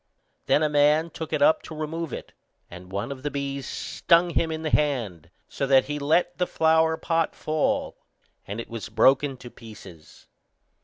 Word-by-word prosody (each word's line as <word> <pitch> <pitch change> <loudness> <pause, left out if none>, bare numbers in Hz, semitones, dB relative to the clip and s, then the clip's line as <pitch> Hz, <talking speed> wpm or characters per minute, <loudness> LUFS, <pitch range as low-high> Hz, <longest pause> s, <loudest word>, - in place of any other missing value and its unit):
Then 155 - +3
a - - +3
man 150 +2 +3
took 160 - -7
it - - +1
up 310 +1 +4
to 160 - -10
remove 155 0 -4
it, - - -8 0.4
and 90 +1 -11
one 100 +7 -3
of 135 -2 -7
the 145 - -2
bees 140 -1 -4
stung 170 +1 +1
him 160 0 0
in 160 0 -4
the 155 - -2
hand, 115 - -1 0.2
so 140 - -3
that 135 -1 +5
he 150 +1 -4
let 170 +5 +1
the 180 - +1
flower 160 0 +2
pot 165 -1 -1
fall, 155 0 -1 0.5
and 105 +3 -5
it 115 - -6
was 115 -3 -7
broken 130 +5 +3
to 120 -1 -11
pieces. 100 -8 -14
145 Hz, 185 wpm, -25 LUFS, 120-160 Hz, 0.5 s, that